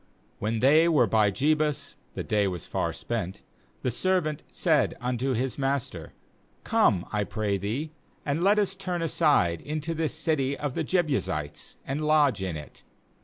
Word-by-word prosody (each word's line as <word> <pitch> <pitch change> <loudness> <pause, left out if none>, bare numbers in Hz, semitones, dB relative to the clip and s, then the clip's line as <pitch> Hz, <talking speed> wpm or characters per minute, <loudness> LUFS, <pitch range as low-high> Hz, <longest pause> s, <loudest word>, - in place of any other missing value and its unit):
nWhen 110 +1 -1
they 155 +5 +5
were 150 -7 +4
by 105 -1 +3
Jebus 150 +6 0 0.2
—the - - -3
day 105 -2 +1
was 90 -3 -4
far - - -1
spent 95 +3 -4 0.2
— - - -36
the 125 - +1
servant 160 +1 0
said - - +2
unto 125 +1 -1
his 130 +3 -2
master: 135 - -2 0.5
'Come, 90 -1 +2
I 105 -1 +1
pray 100 0 -2
thee, 120 - -3 0.3
and 150 +4 0
let 200 +2 +4
us 200 -2 +1
turn 180 -3 -3
aside 145 - +2
into 155 +2 -3
this 160 -1 -1
city 150 -4 0
of 145 -3 -3
the - - -1
Jebusites, 140 - -1
and 140 +3 -3
lodge 150 -7 +3
in 90 -4 -3
it.' 75 - -11
135 Hz, 165 wpm, -27 LUFS, 105-155 Hz, 0.5 s, they